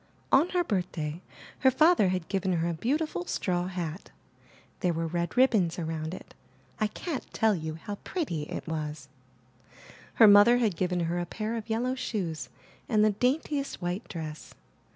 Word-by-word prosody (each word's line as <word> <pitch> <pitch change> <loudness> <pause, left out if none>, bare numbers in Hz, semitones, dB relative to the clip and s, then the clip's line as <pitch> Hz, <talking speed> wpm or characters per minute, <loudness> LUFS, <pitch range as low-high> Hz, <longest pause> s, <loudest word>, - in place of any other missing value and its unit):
On 305 +7 +5
her 360 -1 +1
birthday 175 - -2 0.4
her 265 - +5
father 310 - +5
had 185 -2 -2
given 190 -1 0
her 170 0 0
a 170 - -1
beau 235 - 0
tiful 305 - -4
straw 180 -1 -1
hat. 180 -2 -5 0.7
There 180 -3 +1
were 165 0 -2
red 170 +5 -2
ribbons 215 -10 +3
around 160 0 -3
it; - - -12 0.5
I 215 - +2
can't 290 +6 -5
tell 220 -2 +3
you 160 -3 -4
how 185 +6 -7
pretty 170 - -3
it - - -5
was. 150 -3 -4 1.1
Her 225 - +8
mother 205 +4 +8
had 220 -7 +1
given 180 0 0
her 170 +1 -1
a 175 - -3
pair 215 +5 -3
of 225 0 -6
yellow 240 +3 0
shoes 190 -11 -3 0.4
and 215 -3 +4
the 215 - +4
daintiest 275 +5 -1
white 180 +4 -3
dress. 155 -3 -7
185 Hz, 170 wpm, -28 LUFS, 165-235 Hz, 1.1 s, Her